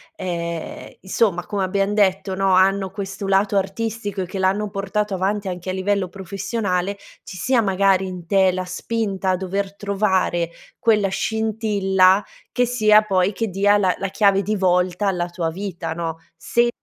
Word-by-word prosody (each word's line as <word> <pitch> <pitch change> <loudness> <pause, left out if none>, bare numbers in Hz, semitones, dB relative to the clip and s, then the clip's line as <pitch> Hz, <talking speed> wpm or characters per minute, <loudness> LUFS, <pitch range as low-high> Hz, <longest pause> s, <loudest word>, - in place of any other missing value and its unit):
ehm, 170 - -5
insomma, 190 -2 0
come 200 -2 -2
abbiam 195 +1 0
detto, 195 -2 +1
no, 190 0 +1
hanno 190 0 +3
questo 195 0 -5
lato 195 +1 +2
artistico 205 0 -2
e - - -2
che 190 +2 -6
l'hanno 200 +3 +1
portato 200 +1 -2
avanti 195 +1 -1
anche 180 +1 -5
a - - -1
livello 190 0 0
professionale, 195 +1 -3 0.3
ci 185 - -9
sia 235 +7 +2
magari 195 -1 +2
in 180 -2 -7
te 190 0 +3
la 185 0 -2
spinta 195 0 -2
a - - +2
dover 195 +2 -3
trovare 190 -4 0 0.3
quella 210 -4 +3
scintilla 205 -3 +2 0.3
che 245 - +2
sia 215 -3 +5
poi 195 -1 +1
che 225 +1 -2
dia 200 +2 +3
la 185 -3 +2
la 195 - -2
chiave 200 0 +3
di 210 +3 -1
volta 180 +1 +1
alla 175 -2 0
tua 175 -2 -3
vita, 185 -2 -5
no? 165 -1 -4 0.2
Se 235 +8 +1
195 Hz, 165 wpm, -21 LUFS, 185-205 Hz, 0.3 s, sia